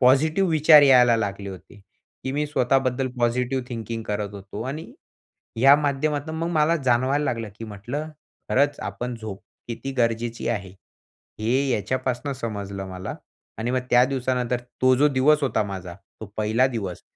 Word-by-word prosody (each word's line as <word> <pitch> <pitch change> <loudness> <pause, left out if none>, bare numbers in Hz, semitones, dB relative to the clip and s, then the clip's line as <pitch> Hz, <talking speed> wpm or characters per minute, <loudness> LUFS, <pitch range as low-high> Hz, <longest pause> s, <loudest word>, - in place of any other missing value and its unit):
...Positive 155 +9 +4
विचार 155 -1 +7
यायला 125 -4 +6
लागले 100 -2 -3
होते 95 -2 -12 0.5
की 130 - -2
मी 150 +2 0
स्वतःबद्दल 130 -2 +1
पॉझिटिव्ह 125 +2 0
थिंकिंग 115 -1 -5
करत 105 -1 -2
होतो 100 +2 -7
आणि 155 +3 -6 0.7
या 135 +4 +7
माध्यमातनं 145 +1 -1
मग 165 +1 -2
मला 160 0 +3
जाणवायला 130 +4 +2
लागलं 115 -5 -2
की 115 - -6
म्हटलं 115 +9 -5 0.4
खरंच 145 +2 +2
आपण 125 0 -4
झोप 105 -3 -7 0.3
किती 125 +4 -5
गरजेची 115 0 0
आहे. 100 -5 -2 0.7
हे 130 +5 +1
याच्यापासनं 130 +5 -1
समजलं 100 -5 -5
मला 95 0 -6 0.4
आणि 115 +2 -2
मग 130 0 +1
त्या 120 0 +6
दिवसानंतर 125 -2 -1 0.2
तो 130 0 +6
जो 145 +3 +4
दिवस 145 +2 +3
होता 120 -5 +1
माझा 95 -3 -6 0.3
तो 110 - -6
पहिला 110 +4 +2
दिवस 105 -9 -4
125 Hz, 150 wpm, -24 LUFS, 110-140 Hz, 0.7 s, विचार